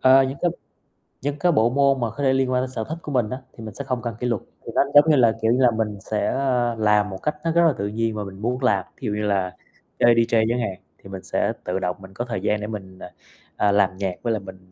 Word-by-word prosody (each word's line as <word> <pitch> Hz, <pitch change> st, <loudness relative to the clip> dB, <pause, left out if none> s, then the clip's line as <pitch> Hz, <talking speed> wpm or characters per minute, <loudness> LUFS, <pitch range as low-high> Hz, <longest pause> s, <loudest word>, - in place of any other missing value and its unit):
Ờ, 130 Hz, +1 st, +7 dB
những 135 Hz, +1 st, -3 dB
cái 175 Hz, -, +3 dB, 0.7 s
những 145 Hz, +2 st, -3 dB
cái 175 Hz, +3 st, +3 dB
bộ 115 Hz, -7 st, +3 dB
môn 140 Hz, +1 st, +3 dB
mà 115 Hz, -, 0 dB
khó 145 Hz, -, -5 dB
thể 130 Hz, -1 st, +4 dB
liên 130 Hz, -1 st, +1 dB
quan 125 Hz, 0 st, +2 dB
đến 130 Hz, -, -4 dB
sở 115 Hz, -3 st, -4 dB
thích 160 Hz, -, -3 dB
của 150 Hz, -, -7 dB
mình 120 Hz, -5 st, +1 dB
á, 130 Hz, +3 st, -5 dB
thì 115 Hz, -, -11 dB
mình 110 Hz, -2 st, -7 dB
sẽ 140 Hz, -, -6 dB
không 125 Hz, -2 st, -2 dB
cần 115 Hz, -3 st, -4 dB
kỷ 125 Hz, -, -1 dB
luật, 115 Hz, -5 st, -1 dB, 0.2 s
thì -, -, -6 dB
nó, -, -, +5 dB
giống 145 Hz, +2 st, +8 dB
như 150 Hz, -, +6 dB
là, 115 Hz, -4 st, +5 dB
kiểu 110 Hz, +1 st, +2 dB
như 125 Hz, +2 st, +2 dB
là, 125 Hz, -2 st, +5 dB
mình 110 Hz, -2 st, -2 dB
sẽ, 105 Hz, +2 st, -2 dB
ơ, 125 Hz, -3 st, +1 dB
làm 105 Hz, -1 st, +2 dB
một 95 Hz, -, -6 dB
cách 150 Hz, 0 st, 0 dB
nó 165 Hz, -, +1 dB
rất 170 Hz, +1 st, +4 dB
là 155 Hz, -, +3 dB
tự 100 Hz, -, -2 dB
nhiên 110 Hz, +1 st, -1 dB
và 105 Hz, -, -3 dB
mình 95 Hz, 0 st, -9 dB
muốn 125 Hz, +4 st, -2 dB
làm, 100 Hz, -7 st, +2 dB
thí 130 Hz, -, -5 dB
dụ 105 Hz, -, -1 dB
như 105 Hz, -, -2 dB
là 95 Hz, -3 st, 0 dB, 0.4 s
chơi 120 Hz, -1 st, +6 dB
DJ 115 Hz, -1 st, +3 dB
chẳng 120 Hz, +1 st, 0 dB
hạn, 110 Hz, -5 st, -2 dB, 0.2 s
thì 95 Hz, -, -14 dB
mình 95 Hz, -1 st, -7 dB
sẽ -, -, 0 dB
tự 90 Hz, +1 st, -2 dB
động 90 Hz, -1 st, -2 dB
mình 95 Hz, 0 st, -13 dB
có 120 Hz, +5 st, -4 dB
thời 110 Hz, -7 st, -4 dB
gian 105 Hz, +1 st, 0 dB
để 105 Hz, -, -4 dB
mình, 95 Hz, -4 st, -8 dB
à, -, -, -9 dB, 0.4 s
à, 100 Hz, -, +2 dB
làm 100 Hz, -2 st, +2 dB
nhạc 95 Hz, -2 st, -2 dB
với 115 Hz, -1 st, +1 dB
lại 110 Hz, -, -1 dB
mình 95 Hz, -1 st, -13 dB
115 Hz, 300 wpm, -23 LUFS, 100-130 Hz, 0.7 s, giống